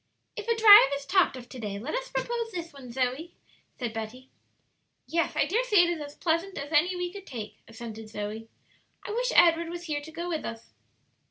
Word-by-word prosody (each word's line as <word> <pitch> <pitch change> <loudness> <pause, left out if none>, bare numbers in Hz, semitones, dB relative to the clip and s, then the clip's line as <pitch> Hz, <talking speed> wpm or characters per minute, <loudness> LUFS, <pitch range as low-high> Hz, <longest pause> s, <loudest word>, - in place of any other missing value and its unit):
"If 430 - -7
a 465 - +2
drive 420 -9 +9
is 280 0 -7
talked 370 -1 +3
of 245 -1 -10
to 260 - -9
day, 205 -3 -4
let 245 +9 -5
us - - -3
propose 475 -2 -3
this 340 -4 -6
one, 265 -4 -11
Zoe," 260 +7 -2 0.4
said 240 -4 -4
Betty. 225 +4 -7 0.7
"Yes; 335 0 -1
I - - +3
dare 460 +6 +1
say 420 -7 +5
it 345 - +1
is 335 -3 -4
as 290 0 -8
pleasant 340 +3 -1
as 285 +2 -6
any 345 +5 +3
we 355 0 -3
could 400 -1 -10
take," 215 -4 -7
assented 225 -1 -9
Zoe. 215 +1 -6 0.6
"I - - -4
wish - - 0
Edward 335 -1 +5
was 345 0 -6
here 300 -3 -3
to 310 +2 -11
go 340 +2 -5
with 325 -3 -2
us." 230 0 -8
320 Hz, 210 wpm, -28 LUFS, 240-365 Hz, 0.7 s, drive